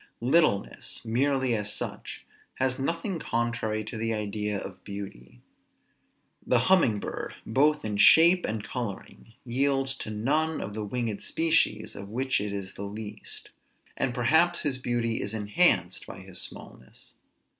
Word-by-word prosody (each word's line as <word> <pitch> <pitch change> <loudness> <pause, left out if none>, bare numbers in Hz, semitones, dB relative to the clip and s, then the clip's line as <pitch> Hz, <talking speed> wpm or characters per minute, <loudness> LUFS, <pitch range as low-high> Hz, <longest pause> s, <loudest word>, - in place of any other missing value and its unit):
Littleness, 130 -7 +1
merely 130 +2 +1
as 105 -2 0
such, - - -5 0.3
has 130 0 0
nothing 165 +6 -2
contrary 115 -4 -1
to 110 +2 -6
the 115 0 -1
idea 105 -1 -2
of 95 - -9
beauty. 100 -12 -9 1.0
The 125 - +3
humming 125 - +4
bird, - - -5
both 150 +4 +2
in 105 -1 -2
shape 170 - +7
and 110 -1 -3
coloring, 115 -1 -6
yields 135 +2 +1
to - - -6
none 150 +9 0
of 100 - -5
the 110 0 -4
winged 110 -1 -3
species, 160 -10 +1
of 100 0 -8
which 130 +1 0
it 105 0 -3
is 100 -1 -5
the - - -9
least; 105 +1 -6 0.4
and 130 - 0
perhaps 160 +9 +3
his 140 -4 -1
beauty 120 -2 -1
is 105 +2 -3
enhanced 105 - +2
by 95 - -9
his 95 -1 -2
smallness. 65 - -7
115 Hz, 145 wpm, -27 LUFS, 105-135 Hz, 1.0 s, shape